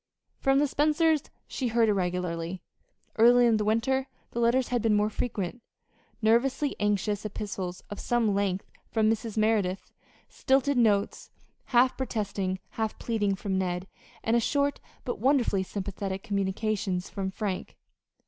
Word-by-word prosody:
From 270 0 +3
the 290 - +4
Spencers 305 +2 +2 0.3
she 260 - -2
heard 230 0 +3
irregularly. 180 -3 -1 0.5
Earlier 240 +2 +6
in 225 -2 +4
the 210 - 0
winter 245 +5 +1 0.2
the 235 - -3
letters 235 +2 +2
had 245 -2 0
been 220 -1 +3
more 210 +1 +2
frequent: 220 -1 -3 0.6
nervously 260 +6 +2
anxious 205 0 0
epistles 200 -4 -5
of 205 - -5
some 235 -4 +1
length 195 -1 0 0.2
from 220 -1 +2
Mrs. 225 -1 -3
Merideth; 215 -4 +1 0.4
stilted 270 0 +1
notes, 205 -4 +1 0.4
half 255 +1 +3
protesting, 200 -7 -2
half 220 -1 -3
pleading, 205 -4 0
from 190 0 -2
Ned; 180 0 -2 0.4
and 235 +1 +2
short, 285 +3 +1 0.3
but 245 - -3
wonderfully 250 -5 +2
sympathetic 195 0 -4
communications 200 -2 -1
from 195 -2 -3
Frank. 190 -1 -4
215 Hz, 135 wpm, -28 LUFS, 195-240 Hz, 0.6 s, Earlier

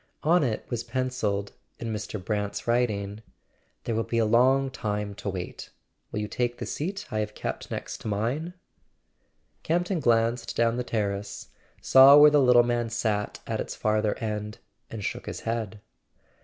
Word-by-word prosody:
On 170 +2 +4
it 115 -5 -2
was 120 -2 -3
pencilled, 120 -5 -2 0.3
in 115 -2 -4
Mr. 105 0 -4
Brant's 105 +1 -3
writ¬ 120 +1 +2
ing: 100 0 -5 0.6
"There 115 - -2
will 110 - +1
be 115 - -2
a 115 - +3
long 130 +4 +3
time 105 -3 -3
to 100 0 -5
wait. 90 -2 -6 0.4
Will - - -3
you 105 - -3
take 120 +2 -2
the - - -5
seat 190 +6 -4
I 110 - -1
have 105 - -3
kept - - -5
next - - -5
to - - -6
mine?" 125 - -2 1.1
Campton 175 +2 0
glanced 115 -2 +1
down 115 0 +2
the 125 - -1
terrace, 100 -3 -3 0.3
saw 135 +2 +8
where 150 0 +9
the 145 -1 +5
little 125 -2 +6
man 120 -1 -1
sat 110 -3 -2
at - - -3
its - - -4
farther 110 -1 0
end, 105 -1 -4 0.3
and 110 -2 -6
shook - - -4
his - - -5
head. 110 -2 -3
115 Hz, 170 wpm, -27 LUFS, 105-125 Hz, 1.1 s, where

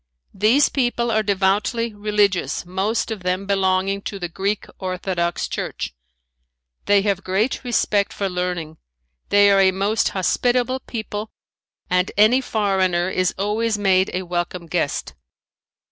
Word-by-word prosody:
These 220 +9 +4
people 240 -3 0
are 220 0 +2
devoutly 205 +3 0
religious, 205 -3 0
most 195 +6 -1
of 215 -4 -4
them 185 +2 -1
belonging 195 0 +1
to 200 - -7
the 175 -2 -4
Greek 195 +4 -2
Orthodox 185 -2 -2
church. - - -4 0.9
They 200 -1 +4
have 200 -2 0
great 205 +9 0
respect 215 -4 +1
for 200 - -2
learning. 180 -3 -3 0.5
They 205 0 +5
are 195 - +4
a 190 - +5
most 200 +3 +1
hospitable 245 +7 +1
people 220 -3 -5 0.6
and 180 +1 +1
any 220 +5 +5
foreigner 190 -6 +1
is 185 -1 0
always 210 +3 0
made 190 -2 +3
a 185 - -2
welcome 175 0 -3
guest. 160 - -2
195 Hz, 130 wpm, -21 LUFS, 185-215 Hz, 0.9 s, They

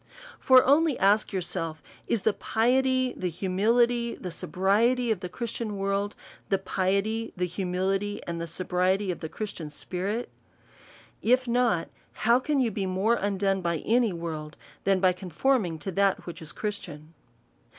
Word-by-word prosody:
For 260 -1 +7
only 295 +1 +4
ask 205 +2 +3
yourself. 165 -4 -3 0.2
Is 230 -4 0
the 220 - +3
piety, 255 +3 +1
the 180 - -2
humility, 230 +7 +1
the 180 - -7
sobriety 220 +9 +1
of 215 - 0
the 180 -1 -6
Christian 225 +1 -4
world, 200 +1 -1 0.3
the 195 - +3
piety, 200 +4 -1
the 180 0 0
humili 190 +3 -1
ty, - - -9
and 170 -1 -4
sobriety 185 +3 0
of 175 - -6
the 160 - -5
Christian 180 -7 -5
spirit? 190 +9 -3 0.9
If 255 +2 +3
not, 235 -8 +2 0.3
how 235 +3 +3
can 290 +2 0
you 240 -4 +2
be 195 -1 -2
more 190 +5 +2
undone 195 -3 0
by 170 -2 0
any 235 -1 +3
world, 160 -3 -6 0.3
than 195 -1 +3
by 185 -1 +4
con 180 0 -9
forming 180 - +1
to 195 - -4
that 195 +1 +1
which 175 - -8
is 160 - -8
Christian 165 -7 -6
195 Hz, 155 wpm, -27 LUFS, 180-235 Hz, 0.9 s, For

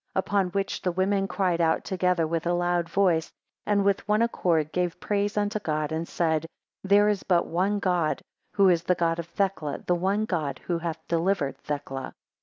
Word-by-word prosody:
22 - - +2
Upon 200 -2 +1
which 195 +1 -2
the 180 - 0
women 195 +2 +1
cried 180 -4 0
out 160 -1 +2
together 180 -3 +1
with 165 +1 -2
a 175 - +2
loud 175 -1 0
voice, 170 -3 +2 0.4
and 200 -1 +2
with 200 0 +1
one 210 +2 +3
accord 165 -9 +1
gave 180 -2 -1
praise 205 0 -1
unto 210 +1 0
God, 155 -5 -2
and 160 +1 -2
said; 160 -2 0 0.4
There 200 +1 +5
is 210 -2 +1
but 175 -2 +2
one 190 +5 0
God, 180 -5 0 0.3
who 200 -1 +5
is 170 -2 +3
the 180 +1 +1
God 170 -1 0
of 170 - -5
Thecla; 175 -6 -2
the 180 - +2
one 195 +5 0
God 160 -9 -2
who 170 -2 -1
hath 165 -1 -5
delivered 170 -4 0
Thecla. 135 -2 -5
180 Hz, 195 wpm, -26 LUFS, 165-195 Hz, 0.4 s, There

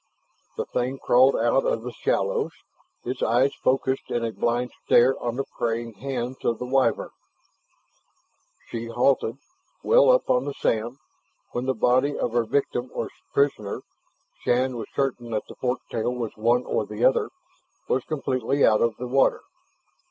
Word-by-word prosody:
The - - -1
thing 130 +2 -2
crawled 130 +1 +4
out 120 +4 +2
of 115 - -1
the 125 - -5
shallows, - - -1 0.5
its 125 +1 -4
eyes 125 +4 +3
focused 130 0 +1
in 120 -1 -1
a 115 - -2
blind 120 +2 -1
stare 125 +3 +5
on 120 -1 -2
the 135 - -1 0.2
praying 115 0 -1
hands 130 +2 -5
of 115 - +1
the 125 - -5
Wyvern. 135 +1 +1 1.6
She 115 0 -5
halted, 120 0 +1 0.5
well - - +5
up - - +4
on 250 -1 +2
the 145 - -4
sand, 115 +4 -1 0.5
when 125 +2 -3
the 130 - +1
body 130 +4 +2
of 120 - -1
her 120 0 +1
victim 125 0 -1
or - - -3 0.2
prisoner 135 -8 0 0.6
Shann 125 +1 +1
was 115 - -5
certain 130 -3 -1
that 110 -2 -2
the - - -10
fork 125 0 -2
tail 115 +1 -1
was 115 -3 -4
one 120 +3 +2
or - - 0
the - - -1
other 475 -3 +3 0.6
was 470 - +1
completely 135 -2 0
out 110 -1 +4
of 115 -1 +2
the 125 - -5
water. 135 +2 +3
125 Hz, 160 wpm, -25 LUFS, 115-135 Hz, 1.6 s, stare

